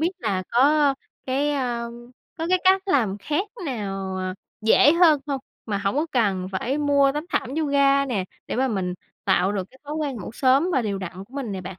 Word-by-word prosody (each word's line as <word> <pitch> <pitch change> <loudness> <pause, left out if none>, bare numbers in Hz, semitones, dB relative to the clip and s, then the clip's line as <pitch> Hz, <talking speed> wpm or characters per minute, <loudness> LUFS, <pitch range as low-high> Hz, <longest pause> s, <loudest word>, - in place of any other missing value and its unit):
biết 335 +3 +2
là 195 - -1
có 285 +2 +4 0.3
cái, 275 +3 +1
a, 245 -4 -1 0.5
có 325 - -2
cái 370 0 +4
cách 380 0 +5
làm 225 - +1
khác 300 - -1 0.2
nào, 195 -6 -3
à, 185 0 -3 0.3
dễ 240 +7 +6
hơn 330 -4 +5
hông 275 -2 -2 0.3
mà 200 -2 -1
hổng 200 +6 -1
có 310 +3 +1
cần 195 -7 +1
phải 255 +9 -1
mua 280 -2 +3
tấm 300 +2 -3
thảm 235 - 0
yoga 280 -2 +3
nè, 205 -8 -1 0.2
để - - -3
mà 265 +1 +2
mình 185 -5 -2 0.3
tạo 185 +3 +2
được 195 -2 -2
cái 265 - -20
thói 295 +1 -5
quen 290 -5 -2
ngủ 200 - -7
sớm 270 +7 +3
và 260 - +2
đều 200 -3 -2
đặn 185 +1 -7
của 245 +6 -20
mình 255 -7 -3
nè 190 - -4
bạn? - - -13
260 Hz, 215 wpm, -24 LUFS, 200-290 Hz, 0.5 s, dễ